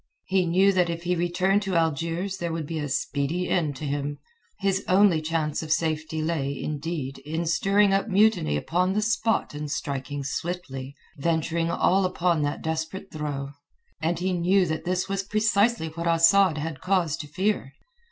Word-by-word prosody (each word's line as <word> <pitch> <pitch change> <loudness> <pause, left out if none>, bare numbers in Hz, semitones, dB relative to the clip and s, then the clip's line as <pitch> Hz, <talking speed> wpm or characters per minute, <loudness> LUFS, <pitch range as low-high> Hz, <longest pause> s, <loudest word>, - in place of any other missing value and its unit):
He 190 -2 +1
knew 190 +4 +4
that 180 -2 +2
if 170 0 -4
he 180 +1 +1
returned 180 +4 +1
to 195 -3 -2
Algiers 165 +4 0
there 170 -2 -3
would 165 -1 -3
be 160 +1 -4
a 145 -1 -3
speedy 145 +6 -1
end 155 -5 0
to 150 - -6
him. 145 0 -2 0.4
His 195 -1 0
only 185 -3 +4
chance 155 -1 -1
of 160 -1 -5
safety 155 0 0
lay, 140 -4 -2
indeed, 150 -3 -4
in 160 +5 -3
stirring 195 +5 +3
up 195 +3 +1
mutiny 200 - +3
upon 180 - 0
the 210 +1 +1
spot 225 -3 0
and 150 0 -5
striking 140 0 -3
swiftly, 140 -3 -4 0.2
venturing 165 +2 0
all 190 +3 +2
upon 180 -3 +1
that 145 0 -2
desperate 160 +4 -4
throw. 145 -3 -4 0.5
And 165 +2 0
he 185 +2 -1
knew 180 +2 +3
that 160 -1 -3
this 180 +1 0
was 195 -1 -1
precisely 215 -2 +1
what 170 +2 -4
Asad 165 +1 +5
had 150 -2 -4
cause 180 -5 +1
to 155 -3 -7
fear. 185 -3 -1
165 Hz, 170 wpm, -26 LUFS, 150-190 Hz, 0.5 s, Asad